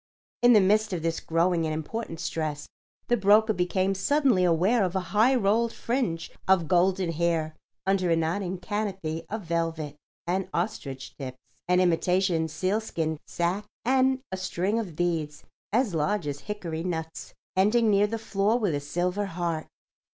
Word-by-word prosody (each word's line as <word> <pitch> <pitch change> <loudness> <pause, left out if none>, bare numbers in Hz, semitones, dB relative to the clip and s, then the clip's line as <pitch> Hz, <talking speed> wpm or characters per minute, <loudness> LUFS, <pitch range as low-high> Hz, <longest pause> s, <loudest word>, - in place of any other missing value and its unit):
In 245 0 +7
the 210 - +7
midst 210 +2 +2
of 170 -3 -3
this 165 0 0
growing 165 0 +1
and 155 - -2
important 165 +2 -5
stress 155 -3 -3 0.4
the 240 - +3
broker 215 +1 +4
became 185 +1 +1
suddenly 260 -1 +2
aware 180 +7 +3
of 185 0 -1
a - - +2
high 230 +6 +5
rolled 230 +1 +2
fringe 230 -12 -2 0.2
of 190 -4 +4
golden 180 +1 +2
hair 165 -1 0 0.3
under 190 -2 +2
a 165 - +4
nodding 175 +3 -1
canopy 185 -5 -3
of 215 0 -4
velvet 165 -3 -2 0.3
and 185 +2 -1
ostrich 160 -8 -4
tips, 130 -2 -6 0.3
an 180 0 +3
imitation 180 -1 +2
sealskin 165 -2 -2
sacque 180 +5 -1 0.2
and 260 +1 +3
a 190 - -3
string 190 +3 -1
of 185 -8 -5
beads 160 -3 -2 0.3
as 230 -2 +1
large 160 +4 0
as 145 -1 -3
hickory 175 -5 -5
nuts, 160 -2 -5 0.2
ending 215 +4 +4
near 205 +1 +4
the 225 +2 -3
floor 215 0 +1
with 205 -9 0
a 145 - 0
silver 180 +7 -1
heart. 170 -3 -3
180 Hz, 160 wpm, -27 LUFS, 165-210 Hz, 0.4 s, In